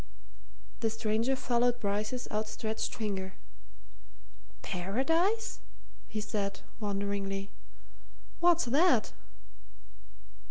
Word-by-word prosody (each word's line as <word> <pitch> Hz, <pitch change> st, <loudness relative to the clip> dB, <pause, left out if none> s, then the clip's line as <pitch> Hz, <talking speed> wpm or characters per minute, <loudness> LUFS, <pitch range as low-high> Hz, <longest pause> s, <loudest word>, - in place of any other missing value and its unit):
The 225 Hz, -, +2 dB
stranger 225 Hz, +3 st, +1 dB
followed 245 Hz, -1 st, +2 dB
Bryce's 215 Hz, +3 st, -1 dB
outstretched 220 Hz, +1 st, -2 dB
finger. 195 Hz, -4 st, -3 dB, 1.3 s
"Paradise?" 325 Hz, -, +1 dB, 0.5 s
he 215 Hz, -, -3 dB
said, 205 Hz, -2 st, -2 dB, 0.2 s
wonderingly. 200 Hz, -1 st, -2 dB, 0.9 s
"What's 345 Hz, -3 st, +5 dB
that?" 295 Hz, +10 st, +4 dB
220 Hz, 70 wpm, -32 LUFS, 200-250 Hz, 1.3 s, What's